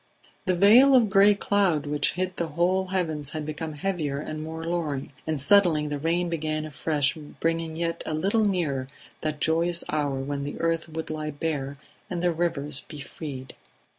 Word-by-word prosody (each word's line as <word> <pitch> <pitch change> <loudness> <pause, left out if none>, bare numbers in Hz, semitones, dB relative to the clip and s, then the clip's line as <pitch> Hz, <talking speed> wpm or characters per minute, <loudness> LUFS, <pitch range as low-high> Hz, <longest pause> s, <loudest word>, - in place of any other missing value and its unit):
The 185 - +3
veil 235 +9 +7
of 230 -5 +4
gray 200 +1 +6
cloud 195 -7 +1
which 145 0 +1
hid 185 0 -2
the 170 - -1
whole 180 +4 +1
heavens 160 -6 -2
had 155 0 -5
become 155 +1 -4
heavier 150 -3 -2
and 155 +1 -5
more 160 +1 -6
louring, 160 -6 -2 0.2
and 155 -2 -1
suddenly 160 0 +4
the 145 -1 -3
rain 170 +4 0
began 155 -2 -2
afresh, 150 -1 0
bringing 165 +1 -3
yet 170 0 -2
a 155 - -1
little 200 +8 +2
nearer 160 -10 0 0.3
that 155 -1 -2
joyous 170 +2 +2
hour 145 -2 0
when 140 +1 -3
the 145 - -5
earth 165 0 0
would 160 0 -5
lie 155 -1 -3
bare 145 -2 -3 0.3
and 175 -1 -3
the 175 -1 +2
rivers 155 -4 -2
be 150 - -8
freed. 135 -2 -7
160 Hz, 175 wpm, -26 LUFS, 150-175 Hz, 0.3 s, veil